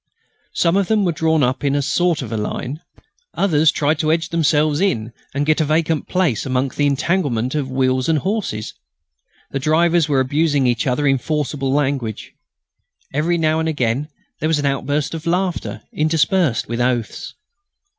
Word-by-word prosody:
Some 170 +2 +2
of 200 -2 +1
them 215 -2 +2
were 175 - +2
drawn 160 -1 +1
up 130 +3 0
in 140 -1 +1
some 145 - +1
sort 170 +1 +1
of 115 - -7
a - - -2
line. 125 +6 -4 0.6
Others 160 -5 +3
tried 150 +1 0
to 155 -1 +1
edge 165 0 0
themselves 155 -2 +2
in 115 - 0 0.2
and 145 +1 0
get 155 +1 +2
a - - +3
vacant 155 0 0
place 180 - 0
among 130 0 0
the 145 +2 0
entanglement 140 -5 0
of 145 -3 -2
wheels 130 +1 +1
and 160 - +3
horses. 185 - -3 0.8
The 135 - -2
drivers 160 +2 +2
were 140 -2 +3
abusing 145 +1 +1
each 120 +1 +1
other 135 +3 0
in 135 -1 +3
forcible 145 -2 -2
language. 135 -6 -1 0.8
Every 165 +5 +1
now 160 -1 +1
and 160 0 0
again 135 0 -1 0.3
there 155 - 0
was 160 - +2
an 145 - -2
outburst 140 +2 -1
of 165 0 -6
laughter 180 0 -1
interspersed 155 - +1
with 115 +1 -2
oaths. 120 -2 -2
150 Hz, 175 wpm, -19 LUFS, 130-160 Hz, 0.8 s, Others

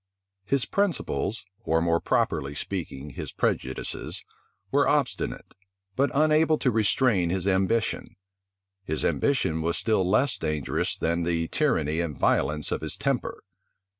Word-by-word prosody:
His 135 +4 +2
principles, 180 - -1 0.2
or, 80 0 +2
more 85 0 +2
properly 70 -2 0
speaking, 75 -6 -5
his - - -6
prejudices, 65 0 -2 0.5
were 140 +1 +3
obstinate, 145 -4 -1 0.4
but 140 +2 +2
unable 155 +1 +4
to 130 - +1
restrain 110 -4 +2
his 90 +1 -1
ambition: 100 +4 0 0.7
his 80 -3 -1
ambition 80 - +1
was 85 +1 0
still 110 -4 +2
less 115 +8 +2
dangerous 75 -3 -1
than 85 +1 0
the 85 -1 -1
tyranny 80 - +1
and 85 -4 -2
violence 75 +2 +1
of - - -1
his - - -4
temper. - - -2
95 Hz, 130 wpm, -26 LUFS, 80-130 Hz, 0.7 s, unable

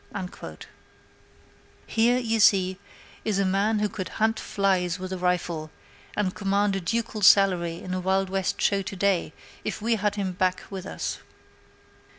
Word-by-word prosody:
There, 195 -2 -4 1.9
you 225 -3 0
see, 190 -3 +4 0.4
is 215 -3 0
a 195 - +2
man 200 +3 +2
who 210 0 +1
could 200 -2 -5
hunt 220 +1 0
flies 185 -3 0
with 185 0 -5
a - - -3
rifle, 175 -3 -1 0.5
and 195 -3 0
command 200 0 +1
a 195 - -2
ducal 225 +3 -2
salary 180 -4 +5
in 185 - -6
a 185 - -1
Wild 190 +1 +1
West 190 -1 -1
show 200 -1 +2
to 195 - -6
day 190 -4 +1 0.3
if 215 - -3
we 225 +1 +1
had 205 0 0
him 195 -3 -2
back 185 0 0
with 190 -1 -6
us. - - -4
195 Hz, 160 wpm, -26 LUFS, 185-205 Hz, 1.9 s, salary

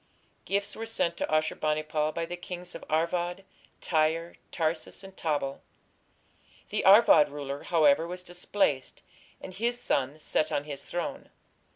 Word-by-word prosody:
Gifts 200 +1 -1
were 225 0 -5
sent 170 -6 0
to - - -2
Ashur 155 0 +2
bani 155 0 0
pal 155 0 0
by 165 +1 -3
the 175 - -5
kings 180 0 -7
of - - -8
Arvad, 175 +4 0 0.4
Tyre, 165 +1 +1 0.2
Tarsus, 160 +3 -2
and 195 0 -12
Tabal. 145 -5 -2 1.1
The - - -1
Arvad 195 -7 +7
ruler, 140 -1 -5
however, 160 -1 +3
was 180 +1 -6
displaced, 175 -6 -1 0.4
and 185 - -9
his 235 +5 -1
son 140 - 0
set 155 0 0
on 140 - 0
his 145 -2 -6
throne. 175 -1 -5
165 Hz, 150 wpm, -29 LUFS, 155-180 Hz, 1.1 s, Arvad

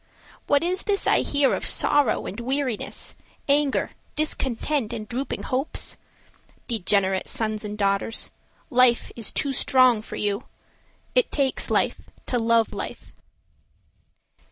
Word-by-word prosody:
What 285 +2 +3
is 365 +2 0
this 400 -1 0
I - - +4
hear 285 -2 +2
of - - -2
sorrow 290 -6 +3
and 205 - -6
weariness, 260 -2 -2 0.3
Anger, 285 -1 +2 0.2
discontent 270 -4 0
and 215 -2 -5
drooping 255 +5 -4
hopes? 265 +4 -2 0.7
Degenerate 195 -4 +1
sons 215 -1 -1
and 210 0 -5
daughters, 200 +2 0 0.4
Life 250 -1 +4
is 230 -3 -3
too 275 - -1
strong 255 -4 +4
for - - -8
you— 205 +3 -2 0.7
It - - +2
takes 275 -3 0
life - - 0 0.2
to 245 - 0
love 230 0 +2
Life. - - -7
245 Hz, 125 wpm, -24 LUFS, 215-280 Hz, 0.7 s, I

